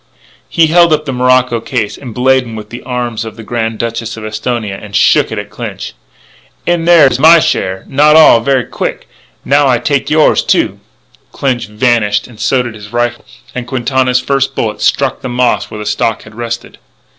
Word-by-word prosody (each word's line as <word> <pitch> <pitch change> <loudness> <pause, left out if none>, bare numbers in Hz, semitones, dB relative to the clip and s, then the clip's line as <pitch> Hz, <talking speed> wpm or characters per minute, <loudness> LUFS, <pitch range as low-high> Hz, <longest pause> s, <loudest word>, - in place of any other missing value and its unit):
He 165 - +3
held 170 +1 +4
up 155 0 -1
the 135 - -3
morocco 125 -1 +2
case, 115 -3 -3
emblazoned 125 -2 -1
with 105 - -10
the 120 - -7
arms 120 -3 -3
of 110 -1 -8
the 115 - -10
Grand 115 -1 -3
Duchess 115 0 -4
of 110 - -7
Esthonia, 110 -1 -3
and 100 -1 -9
shook - - +3
it - - -4
at - - -6
Clinch. - - -7 0.7
"In 170 -1 0
there 170 -3 +6
is 130 -1 +1
my 160 +4 +7
share.... 95 -10 -1
Not 150 +3 +4
all. 155 -7 +7
Ver' 130 +1 +1
quick, - - -5 0.4
now, 140 0 +3
I 125 -2 +3
take 140 +2 -1
yours, 155 0 +3
too - - 0 0.2
" - - -34
Clinch 125 -4 -2
vanished 105 -1 0
and 115 -4 -15
so 130 -2 +1
did 120 -2 -6
his 105 -1 -12
rifle; 120 0 -2 0.3
and 125 -1 -5
Quintana's 130 0 0
first 135 0 -1
bullet 105 -2 -3
struck 130 +5 0
the - - -5
moss 125 0 0
where 110 - -8
the 105 - -6
stock 105 +1 -1
had 110 - -14
rested. 120 +1 -6
120 Hz, 190 wpm, -12 LUFS, 110-135 Hz, 0.7 s, my